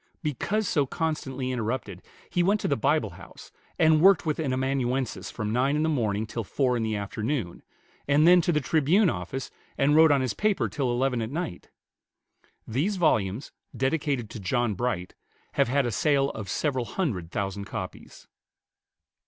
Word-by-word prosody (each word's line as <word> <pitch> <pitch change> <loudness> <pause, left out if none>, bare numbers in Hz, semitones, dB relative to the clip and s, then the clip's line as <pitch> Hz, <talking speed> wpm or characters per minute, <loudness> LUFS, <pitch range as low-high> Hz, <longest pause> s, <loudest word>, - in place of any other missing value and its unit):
Because 195 - -1
so 145 -3 +1
constantly 135 -5 -2
interrupted, 115 -5 -3 0.3
he 175 - 0
went 200 +4 +3
to - - -1
the 140 - +2
Bible 135 -3 +1
House, - - -13 0.3
and 160 -1 +4
worked 190 -1 +6
with 155 -1 -1
an 145 -5 -1
amanuensis 130 -1 -1
from 105 0 -3
nine 135 +4 +2
in 150 - +1
the 160 - +1
morning 110 -7 0
till 115 +1 -4
four 125 +4 0
in 120 - -1
the 110 -1 -1
afternoon, 105 0 -3 0.5
and 145 +3 +4
then 180 0 +7
to 175 - +1
the 150 -2 +1
"Tribune" 160 +7 +3
office, 135 -2 -5 0.3
and 145 +2 +3
wrote 160 0 +7
on 140 -2 +3
his 130 -3 -1
paper 210 -2 +1
till 135 -4 -1
eleven 125 0 0
at 110 - -3
night. 150 - -5 1.0
These 150 - 0
volumes, 110 - +1 0.3
dedicated 135 -4 -1
to - - -7
John 115 +3 0
Bright, 100 -4 -2 0.4
have - - +2
had 140 +2 +1
a 120 - -1
sale 140 +4 +2
of 100 -3 -7
several 130 - -1
hundred 110 - -2
thousand 100 +1 -3
copies. - - -8
135 Hz, 170 wpm, -27 LUFS, 110-155 Hz, 1.0 s, then